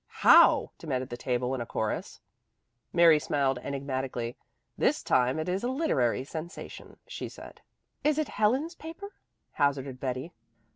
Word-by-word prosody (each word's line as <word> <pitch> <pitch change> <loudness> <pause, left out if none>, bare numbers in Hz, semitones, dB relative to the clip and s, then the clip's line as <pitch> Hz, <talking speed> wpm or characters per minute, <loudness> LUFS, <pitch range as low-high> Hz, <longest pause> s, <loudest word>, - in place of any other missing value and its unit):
"How?" - - +7
demanded 130 -5 -3
the 120 - -5
table 125 +1 -1
in 130 - -2
a - - -3
chorus. 110 -1 -3 0.7
Mary 170 -3 +6
smiled 135 -3 0
enigmatically. 130 -3 -4 0.4
"This - - +1
time 125 +2 +2
it 155 +2 -3
is 185 +3 -1
a - - 0
literary 195 - +1
sensation," 160 +5 -8
she - - -6
said. - - -12 0.4
"Is 300 0 +2
it 310 - -1
Helen's 260 - +1
paper?" 330 +5 -9 0.4
hazarded 135 -2 0
Betty. 130 +5 -4
140 Hz, 140 wpm, -28 LUFS, 130-195 Hz, 0.7 s, How